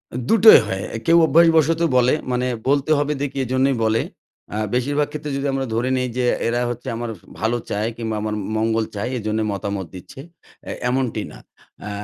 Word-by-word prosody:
আ - - -2
দুটোই 225 -5 +8
হয় 95 -2 -3 0.2
কেউ 165 +1 +5
অভ্যাসবশত 165 -1 +4 0.2
বলে 125 0 +4 0.2
মানে 125 0 0 0.2
বলতে 140 +2 +1
হবে 145 +1 0
দেখি 140 -1 -3
এইজন্যই 130 +2 +1
বলে 110 0 +2 0.5
আ - - -2 0.2
বেশিরভাগ 145 +4 0
ক্ষেত্রে 150 -1 -5
যদি 140 - -2
আমরা 135 0 -1
ধরে 120 +3 0
নিই 125 0 -1
যে 125 - +1 0.2
এরা 120 +1 0
হচ্ছে 120 0 -6
আমার 120 0 -4 0.3
ভালো 115 +2 0
চায় 105 +2 -1
কিংবা 110 -2 -3
আমার 105 0 -2 0.2
মঙ্গল 110 0 +1
চায় 105 +4 -3
এই - - -5
জন্যে 110 0 0
মতামত 100 -1 -4
দিচ্ছে 90 +8 -11 0.5
এ - - -3 0.2
এমনটি 125 -4 -1
না - - -12 0.5
এ - - -4
125 Hz, 185 wpm, -21 LUFS, 110-145 Hz, 0.5 s, দুটোই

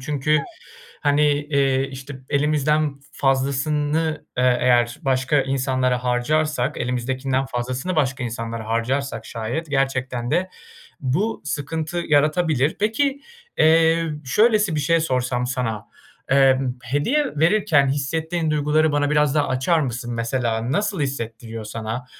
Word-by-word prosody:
çünkü 150 +2 +1 0.6
hani, 145 0 +2
eee, 140 -2 +1
işte, 135 +1 -8
elimizden 150 0 +1
fazlasını, 145 +3 0
eee, 125 -1 +3
eğer 120 -1 +2
başka 130 +2 +2
insanlara 130 -2 0
harcarsak, 135 +2 0
elimizdekinden 130 +2 -1
fazlasını 130 +7 -3
başka 135 -3 0
insanlara 115 -1 -5
harcarsak 115 +1 -1
şayet 120 +8 -4
gerçekten 130 -3 -1
de 180 +4 0 0.5
bu 180 - -1
sıkıntı 160 +3 -3
yaratabilir. 150 -1 +2
Peki, 270 +7 0 0.4
eee, 165 +1 +4 0.2
şöylesi 210 - +3
bir - - 0
şey 165 +3 +2
sorsam 125 -4 -1
sana, 120 -4 -3 0.4
ımm, 135 -2 +3
hediye 145 - +1
verirken 165 -5 +3
hissettiğin 160 +4 -1
duyguları 150 +1 +2
bana 145 0 +1
biraz 150 -1 +2
daha 145 -1 +2
açar 130 +6 +1
mısın 120 -3 -3
mesela? 115 0 -1
Nasıl 205 +1 0
hissettiriyor 115 -4 -4
sana? 110 +3 -5
140 Hz, 115 wpm, -22 LUFS, 125-155 Hz, 0.6 s, eee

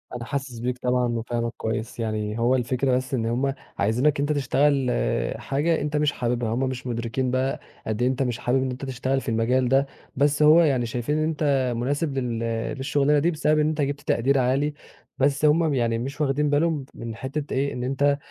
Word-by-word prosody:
أنا 120 - -5
حاسِس 135 -3 -4
بيك 125 +1 -2
طبعًا 125 0 +1
وفاهمك 115 0 -2
كويس. 110 +1 -4
يعني 110 -1 -2
هو 120 +3 +3
الفكرة 130 +1 +1
بس 130 +1 -2
إن 115 -4 0
هم 130 +4 0 0.2
عايزينك 125 +8 +2
أنت 145 +2 +1
تشتغل 140 -1 +2 0.5
حاجة 155 +4 0
أنت 150 +1 -1
مش 150 -1 +2
حابِبها، 120 -3 -1
هم 125 - -1
مش 130 0 -6
مُدركين 120 +2 -2
بقى 130 +1 0 0.3
قد 110 +1 -2
إيه 125 - +3
أنت 130 +1 0
مش 125 -2 -2
حابِب 130 +2 +1
إن 130 - -2
أنت 130 +2 -6
تشتغل 130 +1 -1
في - - -5
المجال 120 +3 +1
ده، 135 +2 +4 0.3
بس 145 +2 +2
هو 155 +3 +7
يعني 135 -7 +2
شايفين 120 +5 -2
إن 155 - +1
أنت 145 -5 +1
مناسب 140 +4 -1
لل 120 -3 -1 0.4
للشُغلانة 145 +2 +2
دي 170 +4 +2
بسبب 155 -1 +1
إن 150 - +3
أنت 155 -1 -1
جِبت 140 0 -2
تقدير 135 +1 +2
عالي، 135 +4 +1 0.4
بس 140 +2 +2
هم 150 +2 +5
م 160 -3 +1
يعني 115 -3 +1
مش 135 +5 -5
واخدين 145 +1 +1
بالهم 150 -1 +1
من 115 -1 -7
حتّة 140 +4 -4
إيه، 140 +1 0
إن 125 - -4
أنت 140 +2 +1
130 Hz, 205 wpm, -24 LUFS, 120-145 Hz, 0.5 s, هو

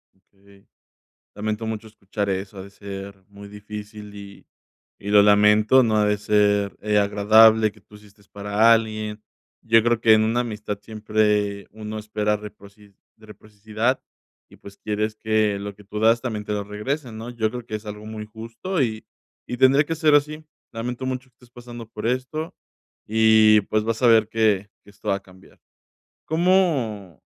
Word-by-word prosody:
Okey. 100 +1 -25 0.7
Lamento 110 +2 -3
mucho 110 0 -5
escuchar 100 -1 -5
eso, 95 +1 -4
ha 95 - -7
de 100 - -12
ser 100 -1 -9
muy 100 0 -13
difícil 105 0 -10
y 100 -1 -12 0.6
y 100 - -5
lo 105 0 +6
lamento, 105 +4 +5
no 110 -3 +1
ha 105 - +3
de 105 0 +2
ser, 105 -1 +1
eh, 105 0 +1
agradable 110 +2 +5
que 105 -1 -22
tú 105 - -18
hiciste 105 0 -19
para 105 +3 +2
alguien. 110 -1 0 0.4
Yo 115 0 +4
creo 120 -1 +1
que 110 -1 +5
en 110 - +4
una 115 +2 +1
amistad 105 -3 -5
siempre 105 -1 -1
uno 110 0 -7
espera 105 0 -1
reproci 100 0 -14 0.2
reciprocidad 110 +3 -4 0.5
y - - -19
pues 100 0 -14
quieres 105 0 -3
que 110 -2 0
lo 100 0 -7
que 105 - -17
tú 105 +2 -6
das 115 +2 +3
también 110 -5 -4
te - - -5
lo 105 -1 -2
regresen, 110 +4 -5
¿no?, 115 +2 -7
yo 110 -2 -1
creo 120 +1 -7
que 110 - -5
es 105 +1 -8
algo 105 +1 -8
muy 110 0 -7
justo 115 - -5
y 110 -3 -2 0.4
y 125 - -5
tendría 135 +4 +4
que 165 - -3
ser 155 -1 +3
así. 150 +2 0 0.3
Lamento 120 +3 -5
mucho 130 0 -5
que - - -42
estés 125 +1 -22
pasando 120 -1 -11
por 110 - -7
esto 130 +6 -3 0.5
y 110 -1 +5
pues 110 +2 -1
vas 115 +1 -3
a - - +6
ver 110 -2 +4
que 105 -3 +1
que - - -19
esto 100 - -14
va 100 - +2
a - - -6
cambiar. 95 0 -20 0.7
¿Cómo?, 155 - 0
110 Hz, 180 wpm, -23 LUFS, 105-115 Hz, 0.7 s, lo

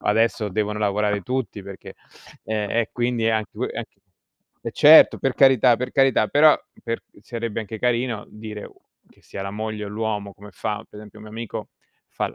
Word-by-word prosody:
adesso 110 0 +1
devono 105 +2 -1
lavorare 105 0 0
tutti 125 -3 -3
perché 100 0 -10 0.5
ehm, 105 -2 -2
e 115 -1 +1
quindi 120 -1 -1
è - - +4
anche 110 -1 -1
u - - -3
anche - - -5 0.6
eh, 115 - -2
certo! 155 +5 +8
Per 135 -1 -1
carità, 130 -3 +5
per 130 - -4
carità. 135 -5 +3
Però, 150 +1 +6 0.3
per 115 0 -3 0.2
sarebbe 115 -1 -5
anche 110 0 -7
carino 120 -2 0
dire 105 -1 -8
o - - -13 0.3
che - - -26
sia 95 - -7
la 100 - -4
moglie 110 0 -4
o - - -6
l'uomo 105 -1 -3
come 105 +1 -13
fa 105 +2 -4
per 105 - -12
esempio, 105 0 -13
un 110 - -12
mio 105 - -11
amico 115 -1 -6 0.4
fa - - -3
l - - -13
110 Hz, 195 wpm, -23 LUFS, 105-120 Hz, 0.6 s, certo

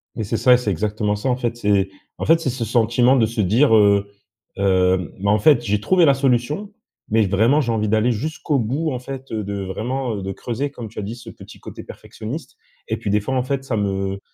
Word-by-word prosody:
Mais, 110 - -3
c'est 105 +2 -2
ça 125 +4 +5
et - - +6
c'est 120 -4 -2
exactement 105 +2 -1
ça, 105 +6 -2
en 125 - +2
fait, 120 -2 -3
c'est 100 -3 +1 0.3
en - - -4
fait, 165 +1 +5
c'est 165 - -2
ce 125 -1 -3
sentiment 120 +3 +3
de 115 - +4
se 115 0 -2
dire: 115 +6 +4
«Heu 100 -1 +4 0.5
hem, 95 -2 +2
mais, 100 +1 0
en 105 +1 +3
fait, 120 +1 +4
j'ai 105 -1 0
trouvé 180 - +4
la 140 - +5
solution, 135 - 0 0.4
mais, 110 0 +3
vraiment, 110 +9 +3
j'ai 120 -4 -1
envie 110 -1 -1
d'aller 110 +3 +2
jusqu'au 150 +4 -2
bout», 140 +8 -1
en 125 - -3
fait, 135 +1 -8
heu, 110 -1 -2
de, 100 0 -4
vraiment, 120 +5 -3
heu, 100 - -5
de 95 - -3
creuser,- 125 +8 -4
comme 120 -5 -8
tu - - -8
as - - -2
dit- 105 +3 -5
ce 120 - -11
petit - - -13
côté - - -10
perfectionniste. 130 +9 -8 0.3
Et - - -1
puis, - - -4
des 105 +1 +3
fois, 130 +6 -3
en 130 - +1
fait, 135 +1 -2
ça 130 - -2
me 95 -1 -2
115 Hz, 245 wpm, -21 LUFS, 105-130 Hz, 0.5 s, et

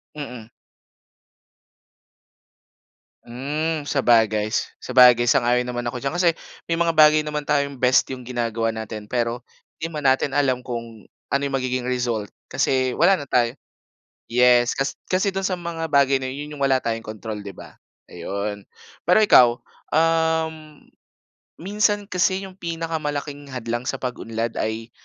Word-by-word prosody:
Mhm. 125 -7 -8 2.8
Uhm, 150 +6 -3
sabagay. 110 -5 +2 0.2
Sabagay, 125 -1 +5
sang-ayon 120 0 +2
naman 120 -1 -4
ako 125 - -6
diyan 140 - -1
kasi 175 -1 +3 0.4
may 165 - +1
mga 170 -1 +1
bagay 155 0 +6
naman 150 -1 -3
tayong 140 -2 0
best 125 +1 +4
yung 130 - -8
ginagawa 115 -2 -2
natin 110 -1 -6
pero 120 0 -1 0.4
'di 165 - -2
man 150 -3 -6
natin 135 +1 +2
alam 130 -3 +1
kung 115 -3 -7 0.3
ano 140 - +2
yung 140 -1 0
magiging 130 -1 -2
result 120 -5 -2 0.2
kasi 130 -1 +1
wala 195 - +4
na 145 - -7
tayo. 120 +1 +1 0.7
Yes, 120 0 +4
kas 135 +1 -1 0.2
kasi 190 +1 +1
do'n 195 - -2
sa 185 -2 -2
mga 165 -2 -5
bagay 140 -2 +3
na 130 - -3
yun. 145 +3 -6
Yun 150 - -10
yung 140 - -5
wala 135 -1 +3
tayong 115 -2 -3
kontrol 110 -1 -6
'di 100 - -7
ba. - - -13 0.3
Ayun. 100 +1 -5 0.4
Pero 180 +5 +4
ikaw, 165 - +7 0.4
uhm, 160 -1 0 0.8
minsan 205 +1 +1
kasi 185 +1 +1
yung 190 0 -14
pinakamalaking 155 -4 -4
hadlang 120 -1 -4
sa - - -1
pag-unlad 115 -2 -4
ay 110 +2 -3
130 Hz, 145 wpm, -22 LUFS, 120-155 Hz, 2.8 s, ikaw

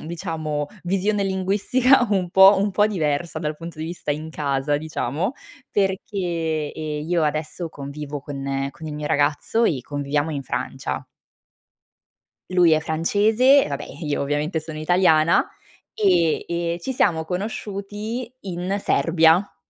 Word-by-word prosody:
mhmm, - - -9
diciamo 155 -3 -3 0.2
visione 195 +3 0
linguistica 210 +7 +3
un 185 -3 +1
po' 190 +2 +8
un 200 +1 +1
po' 205 +2 +3
diversa, 165 -5 -1
dal 150 -1 -2
punto 165 -1 -9
di 155 - -3
vista 165 -2 -5
in 155 +2 -3
casa, 145 -1 0
diciamo, 160 - -2 0.4
perché, 175 -6 -1
ehm, 155 -1 -4
io 175 -2 +2
adesso 155 +3 -2
convivo 145 0 -7
con 135 -1 -3
con 160 +3 -10
il 150 - -5
mio 150 0 -4
ragazzo 145 +11 +1
e 145 - +1
conviviamo 145 +2 -2
in 140 -3 -3
Francia. - - -4 1.5
Lui 180 -2 +4
è 155 - +3
francese 210 - +3
e - - -5
vabbè, 140 -1 -4
ehm, 155 +1 -8
io 145 - -1
ovviamente, 150 +4 -1
sono 155 0 -8
italiana, 160 0 +3 0.5
ehm, 175 -6 +2
e 170 0 -2
ci 265 - -3
siamo 165 -10 +2
conosciuti 210 +5 -4
in 185 +1 -3
Serbia. 165 +5 +3
165 Hz, 145 wpm, -23 LUFS, 150-190 Hz, 1.5 s, po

